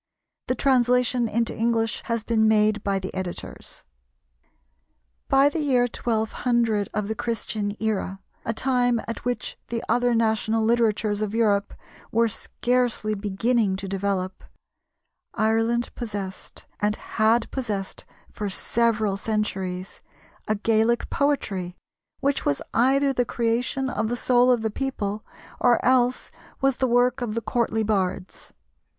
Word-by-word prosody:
The 255 - +1
translation 250 -2 +2
into 230 +1 0
English 225 -1 0
has 230 -2 -1
been 220 -1 +2
made 215 -1 +3
by 200 -1 0
the 190 0 -5
Editors.] 185 -2 -6 1.5
By 275 +1 +5
the 290 +3 -1
year 265 -5 +3
1200 230 -2 0
of 210 -2 -2
the 220 - -1
Christian 215 -2 -3
era, 200 -3 -2 0.2
a - - -1
time 245 0 +1
at 230 - -5
which 245 0 -3
the 230 -1 -3
other 245 +1 +2
national 220 0 +1
literatures 220 -2 +1
of 215 0 -2
Europe 205 -3 +1 0.4
were 230 +1 +3
scarcely 240 -1 -1
beginning 210 +1 +1
to 195 +1 -6
develop, 195 -1 -2 0.9
Ireland 225 +2 +1
possessed, 205 -5 -6
and 210 0 +1
had 225 +2 +1
possessed 210 -7 -4 0.3
for 205 -1 -3
several 215 0 +1
centuries, 195 -4 -3 0.5
a 215 - +1
Gaelic 225 +2 +1
poetry, 195 -11 -1 0.4
which 280 0 +1
was 140 - +1
either 270 +3 +3
the 245 - +2
creation 240 +3 -1
of 220 -4 -1
the 240 - -2
soul 250 0 +4
of 240 -3 +2
the 220 - 0
people 215 -5 -3 0.4
or 245 -2 +4
else 250 0 +2 0.3
was 270 -1 +2
the 260 - +1
work 245 +1 +2
of 225 -3 -2
the 230 - -1
courtly 225 -1 0
bards. 195 -3 -2
225 Hz, 130 wpm, -24 LUFS, 210-245 Hz, 1.5 s, By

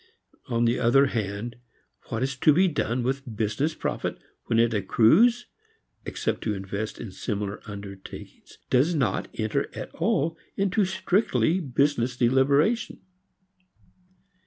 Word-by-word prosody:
On 120 -1 +1
the 120 +1 +2
other 125 +4 +5
hand, 110 -1 -3 0.5
what 115 +1 -2
is 135 0 -1
to 155 - +5
be 185 +5 +4
done 125 -7 -1
with 130 -2 -3
business 115 +9 0
profit - - -3 0.3
when 115 - 0
it 115 0 +3
accrues 165 - +4 0.6
(except - - -2
to 105 -2 -1
invest 100 +2 -4
it - - -5
in 105 - -7
similar 100 0 -4
undertakings) 100 -2 -10
does 145 +7 +3
not 135 -6 0
enter 110 -1 -1
at - - -7
all 165 +3 0 0.2
into 195 +2 +1
a 190 - +2
strictly 185 - +1
business 135 -4 0
deliberation. 140 - +2
125 Hz, 135 wpm, -26 LUFS, 110-155 Hz, 0.6 s, other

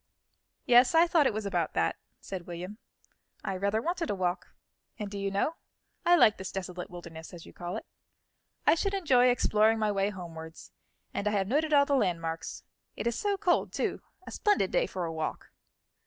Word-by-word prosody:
"Yes, 245 +5 +6
I 330 +1 +7
thought 330 -5 +4
it - - 0
was 215 0 -3
about 175 -5 -1
that," 80 - +1 0.2
said 185 -3 -7
William 180 +5 -7 0.6
"I 195 - -2
rather 200 +4 0
wanted 345 -1 -2
a - - 0
walk, 180 -1 -1 0.5
and 210 -3 -5
do 205 - -5
you 200 0 -1
know, 200 +12 -1 0.5
I 350 - +7
like 220 -10 +5
this 190 - -6
desolate 180 -2 -5
wilderness, 170 -1 -9
as 170 - -11
you - - -13
call 175 +1 -5
it. - - -8 0.8
I - - +7
should 395 +4 0
enjoy 265 -10 +4
exploring 225 -2 +3
my 215 -1 +1
way 195 0 +1
homewards, 165 -4 -9 0.4
and 205 - -2
I - - +2
have 195 -2 +1
noted 305 +7 +1
all 285 -1 +6
the 280 - 0
landmarks. 165 -8 -2 0.3
It - - -5
is 235 -1 +1
so 405 +8 0
cold, 355 -2 +1
too; - - -1 0.2
a - - -8
splendid 415 -1 +2
day - - +2
for 180 - -3
a 165 - -4
walk." 160 -1 -4
205 Hz, 195 wpm, -29 LUFS, 180-280 Hz, 0.8 s, I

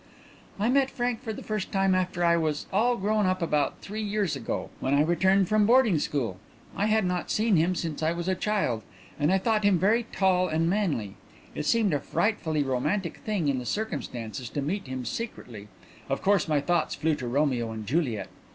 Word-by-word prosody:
"I 210 - +1
met 270 +1 +3
Frank 245 -3 -2
for 230 -4 -4
the 215 - -7
first 215 -3 -3
time 195 -1 +2
after 180 -1 0
I 170 0 +5
was 155 -3 -1
at - - -19
all 240 +4 +3
grown 210 0 +1
up 185 0 +1
about 150 -4 0
three 215 +2 -5
years 205 -4 -1
ago, - - -4
when 135 +2 +1
I 145 - +4
returned 190 +4 +3
from 215 0 +3
boarding 230 -8 +5
school. 120 -11 -2 0.4
I 205 - +1
had 215 -2 +2
not 180 -1 -2
seen 215 -1 +2
him 170 +3 +2
since 165 -3 -3
I 160 +1 +2
was 170 +1 -4
a 190 - +2
child, 185 - 0 0.4
and 150 +4 +2
I 190 - +4
thought 215 +2 +1
him 200 -2 +4
very 220 +6 +2
tall 185 -1 +2
and 160 0 0
manly. 170 - -1 0.4
It 150 - -4
seemed 220 -7 +3
a 145 - +1
frightfully 160 -4 0
romantic 150 +8 -1
thing 205 -8 -2
in 135 -2 +1
the 125 - -7
circumstances 125 - -4
to 145 - -3
meet 185 +3 -3
him 130 -1 -5
secretly 120 - -6 0.4
of 135 - -2
course 195 -4 +3
my 150 -2 +2
thoughts 175 0 0
flew 160 +2 +1
to 130 -4 -5
Romeo 125 -3 0
and 110 -1 -6
Juliet. 120 - -1
175 Hz, 205 wpm, -27 LUFS, 145-210 Hz, 0.4 s, I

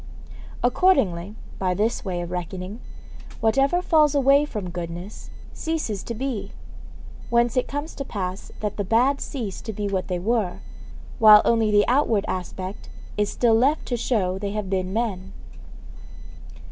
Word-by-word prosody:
Accordingly, 210 - +2 0.2
by 185 -1 0
this 220 +4 0
way 180 -4 -3
of 175 0 -6
reckoning, 180 +4 -5 0.6
whatever 275 +10 +2
falls 305 -4 +4
away 280 +1 +5
from 205 -10 -5
goodness 175 +3 -7 0.2
ceases 310 - -3
to 235 - -4
be; 250 -3 -4 0.8
whence 235 0 +2
it 255 - +1
comes 290 +3 -4
to 275 - -5
pass 190 -6 -5
that 210 -1 -3
the 205 - 0
bad 245 +8 +2
cease 225 -9 -5
to 220 - -5
be 205 0 -3
what 190 -2 -2
they 180 - -1
were, 205 -1 -1 0.6
while 215 -1 +9
only 225 -2 +3
the 205 0 +4
outward 240 -5 +2
aspect 185 +1 -5 0.3
is 210 -1 0
still 235 -2 +2
left 265 +7 +2
to 245 - 0
show 195 -6 0
they 200 0 -3
have 210 -3 -4
been 185 -1 -1
men. 195 -4 -3
215 Hz, 150 wpm, -24 LUFS, 185-245 Hz, 0.8 s, while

